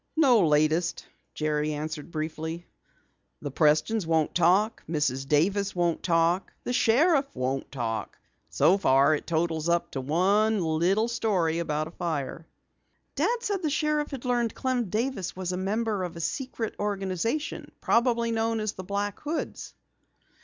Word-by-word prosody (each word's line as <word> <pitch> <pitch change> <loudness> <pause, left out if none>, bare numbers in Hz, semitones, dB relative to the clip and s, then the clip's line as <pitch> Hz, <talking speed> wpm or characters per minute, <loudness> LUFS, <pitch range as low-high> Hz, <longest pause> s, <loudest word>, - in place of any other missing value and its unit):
"No 245 - +5
latest," 155 +3 +1 0.3
Jerry 150 0 0
answered 155 +1 -5
briefly. 160 +1 -4 0.8
"The 145 - -4
Prestons 155 +7 +2
won't 160 -2 +1
talk, 185 +6 +3
Mrs. 135 -4 -1
Davis 190 +8 +1
won't 175 -2 0
talk, 170 +1 +1
the 245 - -2
sheriff 275 +5 +3
won't 130 +1 -2
talk. 115 -5 -4 0.3
So 190 +4 +3
far 140 -3 +4
it 150 - -3
totals 165 -1 0
up 170 0 +1
to 135 - -3
one 200 +9 +2
little 175 +6 +1
story 195 -9 0
about 155 -2 -1
a - - -10
fire." 165 -2 -4 0.7
"Dad 455 - 0
said 405 -5 -1
the 315 - 0
sheriff 300 0 0
had 270 -3 -7
learned 240 -2 0
Clem 255 -2 0
Davis 220 -2 -2
was 185 -1 -3
a - - -2
member 210 +2 -1
of 175 -1 -5
a - - -7
secret 230 - -3
organization, 205 - -2
probably 235 -1 +2
known 225 0 0
as 215 -1 -1
the 185 - -8
Black 200 +2 -3
Hoods." 305 +1 -5
185 Hz, 145 wpm, -27 LUFS, 155-230 Hz, 0.8 s, No